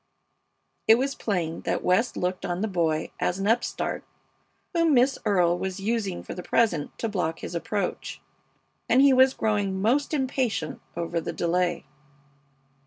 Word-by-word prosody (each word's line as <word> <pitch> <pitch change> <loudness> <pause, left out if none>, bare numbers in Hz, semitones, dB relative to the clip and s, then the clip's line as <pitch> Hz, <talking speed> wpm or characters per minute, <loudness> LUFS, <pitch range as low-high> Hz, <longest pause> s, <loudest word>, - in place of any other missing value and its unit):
It 220 - +8
was 270 +3 -1
plain 175 -9 -2
that - - -2
West 190 +7 +2
looked 180 +1 -2
on 175 +1 -2
the 220 - 0
boy 165 -5 0
as 180 - 0
an 195 - -3
upstart 230 +3 0 0.7
whom 335 -4 +3
Miss 255 +3 +3
Earle 175 -4 +3
was 190 0 -3
using 200 -3 -2
for - - -7
the 180 - -6
present 180 -7 0
to 230 - -2
block 180 -6 -2
his - - -6
approach, 200 +4 -3 0.7
and 260 +2 +5
he 280 -1 +6
was 260 +1 +5
growing 205 -3 0
most 250 +8 +1
impatient 260 - -1 0.2
over 170 0 -2
the - - -4
delay. 175 -1 0
200 Hz, 155 wpm, -26 LUFS, 175-240 Hz, 0.7 s, It